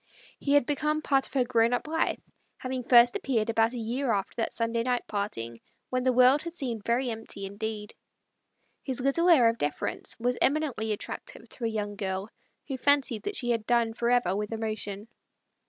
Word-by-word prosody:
He 280 - 0
had 290 -4 +5
become 305 +2 -1
part 270 -2 +2
of - - -20
her 260 - +4
grown 235 -1 +2
up 245 - -1
life, 320 +1 0 0.4
having 255 0 -4
first 240 0 +6
appeared 230 -4 0
about 225 +1 +2
a - - -4
year 240 +3 -1
after 195 -1 -2
that 225 - -1
Sunday 230 0 0
night 245 0 -1
parting, 115 - -4 0.3
when 255 0 +1
the 255 0 +2
world 255 +3 +5
had 335 - -6
seemed 240 -10 -3
very 240 +2 0
empty 220 -3 -5
indeed. 210 +1 -5 0.9
His 260 -3 -3
little 275 +7 +2
air 270 -9 +7
of 230 0 0
deference 145 0 -1
was 245 +1 0
eminently 275 -7 +1
attractive - - -6
to 240 - -5
a 225 -1 -1
young 205 -1 -3
girl 190 +1 -3 0.4
who 270 -3 -3
fancied 275 -5 +2
that 410 - -4
she 240 -2 -1
had 225 -2 -1
done 235 -2 +2
for 235 +1 -1
ever 240 -7 +2
with 210 +1 -3
emotion. 215 -2 -4
235 Hz, 190 wpm, -28 LUFS, 220-260 Hz, 0.9 s, air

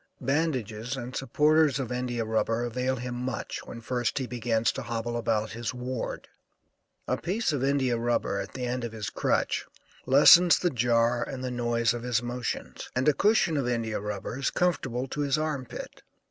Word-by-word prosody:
Bandages 130 -4 -1
and 125 0 -6
supporters 150 +2 +3
of 130 -3 -3
India 125 -2 -2
rubber 115 +1 0
avail 125 +2 -1
him 125 0 -5
much 125 -1 -4
when 115 - -8
first 120 +2 -1
he 130 - 0
begins 115 -2 0
to - - -5
hobble 120 0 -3
about 110 -2 0
his 115 +2 -4
ward. 125 -1 -4 0.8
A 130 - +1
piece 190 0 0
of 135 -3 -1
India 135 -4 +1
rubber 115 -4 0
at 100 0 -6
the 125 -1 -3
end 125 0 -2
of 115 -1 -4
his 110 -2 -4
crutch - - 0 0.4
lessens 165 +6 +8
the 175 - 0
jar 120 0 +2
and 130 -1 -6
the 130 - -2
noise 120 -2 +1
of 120 - -4
his 120 -1 0
motions, 120 0 -4
and 130 +3 +1
a 150 - +6
cushion 200 -6 +3
of 135 -3 0
India 115 -3 -1
rubber 105 +4 -5
is 135 - +1
comfortable 135 -8 0
to 145 - -4
his 140 0 +1
arm 155 -5 -2
pit. - - -8
125 Hz, 185 wpm, -28 LUFS, 115-135 Hz, 0.8 s, lessens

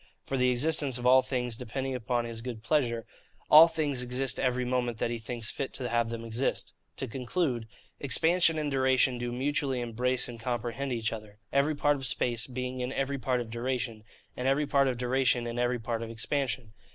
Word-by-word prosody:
For 135 - -2
the 125 -1 +3
existence 135 +1 +1
of 125 - -6
all 130 +1 +7
things, 125 -3 -2
depending 130 +3 -4
upon 120 -1 -1
his 115 -1 -6
good 115 -2 -6
pleasure, 120 -5 +1 0.5
all 155 +2 +11
things 150 -6 -1
exist 125 0 -1
every 125 -1 +1
moment 125 -2 0
that 115 - -1
he 120 - -3
thinks 115 0 -4
fit 135 - -4
to 125 - -3
have 115 -1 +1
them 115 0 -5
exist. 115 +4 -1 0.2
To - - -3
conclude: 125 -1 -1 0.3
expansion 165 +5 +3
and 150 -2 -1
duration 130 -2 +3
do 120 0 -3
mutually 135 +1 0
embrace 120 +2 0
and 120 -2 -8
comprehend 120 +3 -3
each 115 -2 -1
other; 105 -2 -8 0.2
every 140 +3 +3
part 145 0 +2
of 135 -1 0
space 120 0 0
being 125 0 -4
in 125 +1 -2
every 135 0 -1
part 125 0 0
of 115 -2 -7
duration, 120 -2 -3 0.3
and 125 - -2
every 140 +3 +3
part 140 -1 +3
of 125 -2 0
duration 125 -1 +2
in 120 0 -3
every 125 0 +1
part 115 0 -3
of 115 - -5
expansion. 125 -1 -2
125 Hz, 200 wpm, -29 LUFS, 120-135 Hz, 0.5 s, all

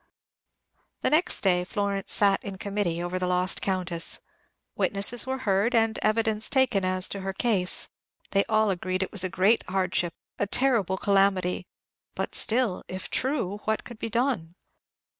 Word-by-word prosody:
The - - +1
next 315 +4 +2
day 180 -2 +3
Florence 200 0 -2
sat 200 -1 +3
in 195 -2 -6
committee 195 -4 -2
over 180 +1 -3
the 180 - -1
lost 180 +1 +1
Countess. 180 -3 -2 0.6
Witnesses 205 +5 +1
were 265 0 -1
heard 205 +4 +2
and 225 -1 +2
evidence 220 0 +1
taken 260 -8 +2
as 185 0 +1
to 200 - -4
her 195 0 -4
case. 190 -4 +1 0.4
They 195 0 +3
all 215 -2 +2
agreed 185 +1 -2
it - - -6
was 205 -4 +2
a 185 - -1
great 195 +6 +2
hardship, 185 -2 0 0.2
a 205 - 0
terrible 220 -6 +2
calamity; 195 -2 +1 0.5
but - - -3
still, 230 -4 +3
if 185 0 -7
true, 210 -7 -1
what 220 0 -1
could 240 -3 -10
be 230 - -4
done? 225 -8 -1
195 Hz, 160 wpm, -26 LUFS, 185-220 Hz, 0.6 s, day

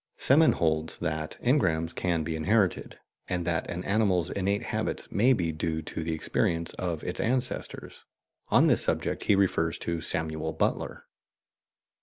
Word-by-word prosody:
Semon 155 +4 +4
holds 80 -1 0
that 80 -2 -3
engrams 85 - +1
can 85 -3 -1
be 80 +1 -3
inherited, 95 +3 0 0.3
and 90 -2 -2
that 85 -2 -1
an 90 +1 -4
animal's 95 -5 +1
innate 100 +1 -1
habits - - -3
may 120 +6 +3
be 90 -10 +1
due 80 0 -3
to 80 - -5
the 80 0 -2
experience 85 +1 -1
of 85 -4 -4
its - - -3
ancestors; 125 +2 +1 0.4
on - - +4
this - - +3
subject - - -1
he 105 - +4
refers 85 -4 +1
to 85 -1 -3
Samuel 80 0 -2
Butler. 80 - -2
85 Hz, 150 wpm, -28 LUFS, 80-100 Hz, 0.4 s, Semon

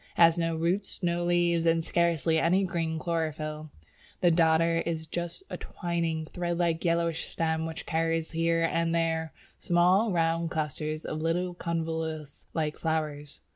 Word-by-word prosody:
It - - +2
has 165 -1 +7
no 165 -1 0
roots, 175 +5 -1
no 175 0 +1
leaves, 175 -1 +2
and 165 0 +3
scarcely 170 -1 +2
any 180 +4 +3
green 165 -3 -1
chlorophyll; 155 -2 -3 0.5
the 175 - +4
Dodder 165 0 +3
is 160 -1 -3
just 175 - -5
a - - -3
twining, 170 -3 -2
thread 175 +1 -3
like, 170 -2 0
yellowish 170 -1 +1
stem 160 0 -1
which 160 -1 -6
carries 165 0 0
here 165 0 +1
and 165 0 +1
there 160 -1 0 0.3
small 180 +5 +3
round 165 -1 +1
clusters 155 -1 -3
of 155 - -3
little 175 +2 0
convolvulus 160 -3 -4
like 155 -2 -1
flowers. 150 -3 -3
165 Hz, 150 wpm, -28 LUFS, 160-170 Hz, 0.5 s, has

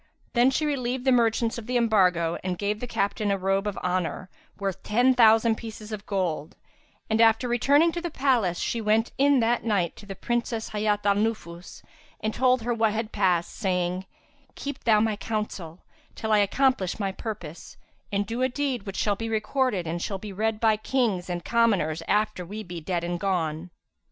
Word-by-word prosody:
Then 245 +1 +5
she 305 +3 0
relieved 255 -3 -2
the 265 - +4
merchants 230 -1 +2
of 220 - -10
the 250 0 +1
embargo 180 -8 +3
and 185 -1 -2
gave 205 +2 -1
the 245 - -5
captain 205 -1 -1
a 200 - +1
robe 195 +2 0
of 205 - -3
honour 185 0 -2 0.3
worth 195 -3 -3
ten 245 +5 +3
thousand 225 -2 +5
pieces 220 -1 -9
of 210 -1 -6
gold; 175 -6 -2 0.5
and, 220 +1 +2
after 225 +2 +4
returning 280 +7 +3
to 345 - -4
the 345 - -3
palace, 250 - +1
she 230 - -2
went 220 +2 +2
in 280 -2 +4
that 230 +1 +1
night 200 -7 0
to 205 - -13
the 195 - -6
Princess 235 +1 -2
Hayat 210 -1 -1
al 200 - +5
Nufus 200 -5 -3 0.4
and 215 0 -2
told 255 -1 +2
her 240 +1 0
what 225 -2 +1
had 220 0 -3
passed, 180 -4 +1
saying, 180 -1 -1 0.5
"Keep 285 -1 -6
thou 220 -3 +5
my 220 -1 +1
counsel, 200 -6 -5 0.3
till 220 - -3
I 210 - +5
accomplish 205 -2 +1
my 195 -2 -1
purpose, 190 -7 -8 0.3
and 200 0 0
do 230 +4 -4
a 260 - +2
deed 260 -5 -2
which 195 - -5
shall 205 -1 +1
be 225 +3 -4
recorded 220 -2 0
and 170 +1 -3
shall 195 - -3
be 200 +1 -8
read 215 +2 -1
by 220 -1 +3
Kings 215 -6 -1
and 175 -1 -4
commoners 195 -10 +2
after 210 -3 +1
we 210 +5 -7
be 175 -3 -7
dead 175 +1 -2
and 175 0 -2
gone." 170 -3 -1
215 Hz, 190 wpm, -26 LUFS, 190-235 Hz, 0.5 s, Then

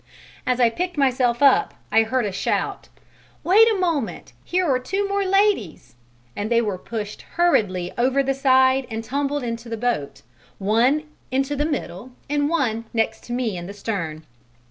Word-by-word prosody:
As 250 0 +1
I 235 -2 +4
picked 355 +5 -3
myself 255 -2 +2
up, 275 -2 +4 0.2
I 225 - +5
heard 235 +2 0
a 205 - -2
shout: 185 - -2 0.6
"Wait 435 +6 +6
a 425 - 0
moment, 335 -6 -2
here 365 +1 0
are 260 -3 +2
two 390 +10 -2
more 400 0 0
ladies," 390 - +1 0.4
and 205 +1 -3
they 235 -1 +3
were 205 -5 -2
pushed 215 -1 -6 0.2
hurriedly 195 - +2
over 260 +3 +2
the 270 0 0
side 260 -1 +3
and 225 0 -4
tumbled 280 +3 -2
into 230 0 -5
the 225 - -3
boat, 225 -11 -2 0.3
one 235 +9 +2 0.3
into 270 +2 0
the 295 +1 0
middle 255 - -5
and 290 0 0
one 235 -9 0
next 225 -1 0
to 240 - -5
me 240 -5 -1
in 175 0 -6
the 200 - -8
stern. 170 -7 -4
255 Hz, 170 wpm, -22 LUFS, 225-290 Hz, 0.6 s, Wait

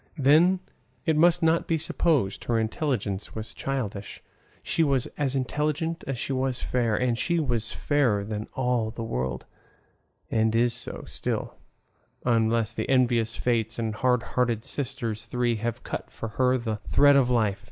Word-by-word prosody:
Then, 160 +7 +5 0.4
it 160 - +2
must 170 +2 +4
not 165 +1 +3
be 165 - +2
supposed 145 - 0
her 115 - +1
intelligence 110 - -2
was 110 0 -6
childish; 105 -7 -4 0.4
she - - 0
was 135 -5 +2
as 140 -2 -1
intelligent 150 +6 -1
as 135 -2 -2
she 135 - -2
was 130 -1 0
fair, 120 -3 0
and 125 +1 +1
she 170 +8 0
was 120 -7 -1
fairer 125 -9 +1
than 105 0 -4
all 125 -4 +1
the 115 +1 -6
world; 65 - -3 0.9
and 110 0 +2
is 120 +1 +3
so - - -5
still, - - -3 0.7
unless 115 -1 +2
the - - -3
envious 120 -4 +2
fates 115 -2 0
and 115 -2 -2
hard 125 +1 +1
hearted 120 -3 +1
sisters 120 -6 -3
three 120 0 0
have 115 +1 -3
cut - - -5
for 115 - -6
her 130 +4 +2
the 115 -3 -3
thread 145 0 +6
of 135 -3 +4
life. 110 -5 +1
120 Hz, 160 wpm, -26 LUFS, 110-140 Hz, 0.9 s, thread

